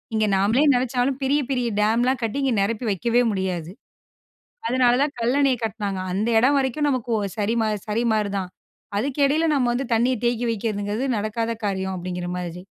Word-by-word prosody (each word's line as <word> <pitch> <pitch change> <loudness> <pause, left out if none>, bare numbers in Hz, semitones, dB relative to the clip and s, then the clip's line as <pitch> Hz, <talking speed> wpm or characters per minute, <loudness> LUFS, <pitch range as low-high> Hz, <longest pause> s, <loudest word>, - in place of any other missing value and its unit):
இங்க 215 0 +2
நாமளே 210 +8 +3
நினைச்சாலும், 255 +1 0
பெரிய 285 +2 +2
பெரிய 250 -3 0
டேம்லாம் 240 +4 +2
கட்டி 225 +3 -2
இங்க 265 - +2
நெரப்பி 225 +4 -1
வக்கவே 235 +5 +1
முடியாது. 180 -4 -3 1.0
அதனால 250 -1 +3
தான் 290 0 -1
கல்லணைய 260 +2 +2
கட்னாங்க. 205 -3 -3
அந்த 210 +5 0
எடம் 270 +5 +4
வரைக்கும் 275 +2 0
நமக்கு 255 -4 -1
ஒ - - -1 0.2
சரிமா 220 +1 +1 0.2
சரிமாரிதான். 210 -4 0 0.5
அதுக்கு 270 +7 -2
இடையில 310 +4 +2
நம்ம 255 -4 +2
வந்து 255 +2 -2
தண்ணீய 245 +3 +2
தேக்கி 240 0 0
வைக்கிறதுங்கிறது 215 +2 -2
நடக்காத 215 +2 -2
காரியம், 190 -1 -2
அப்படிங்கிற 180 0 -4
மாதிரி. 180 0 -6
230 Hz, 155 wpm, -23 LUFS, 205-255 Hz, 1.0 s, எடம்